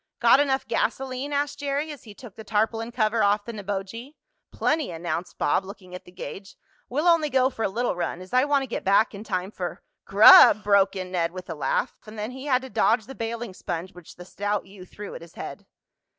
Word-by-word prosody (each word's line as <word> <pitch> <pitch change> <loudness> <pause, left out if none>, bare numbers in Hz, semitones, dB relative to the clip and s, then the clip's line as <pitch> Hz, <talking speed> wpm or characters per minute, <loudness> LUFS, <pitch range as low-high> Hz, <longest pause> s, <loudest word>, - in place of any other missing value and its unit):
"Got - - +6
enough 275 -2 +1
gasoline?" 260 +4 -2
asked 285 0 -1
Jerry, 285 +2 -2
as 290 -5 -11
he 210 -2 -12
took 230 -5 -12
the 220 - -10
tarpaulin 225 +2 -1
cover 225 -1 +1
off 205 0 +2
the 235 - -6
Neboje. 205 +6 -6 0.4
"Plenty," 310 -2 0
announced 170 +1 -4
Bob, 180 - +1
looking 190 -2 -12
at 180 - -9
the - - -15
gauge. 195 +2 -9 0.3
"We'll 295 +7 0
only 330 -3 +4
go 260 0 +2
for 225 - -8
a 220 - +1
little 235 +1 -1
run, 175 0 -3
as 185 +3 -12
I 255 +1 +5
want 285 -2 +2
to - - -6
get 235 - -4
back 200 +4 +3
in 200 +1 -8
time 185 -2 -3
for 180 -4 -6
" - - -57
"Grub!" 210 +1 +9
broke 200 -1 +3
in 185 -1 -5
Ned 170 -2 -1
with 185 -2 -8
a - - -2
laugh, 150 - -1
and 215 +1 -10
then 215 +3 -4
he 265 +2 -9
had 260 -2 +1
to 265 - -8
dodge 220 -1 +2
the 270 - -9
bailing 230 -3 -5
sponge 175 +1 -5
which 180 -2 -14
the 180 - -11
stout 205 +2 -3
youth 190 -2 -14
threw 205 -1 -8
at - - -8
his 170 -1 -14
head. - - -8
215 Hz, 230 wpm, -25 LUFS, 190-255 Hz, 0.4 s, Grub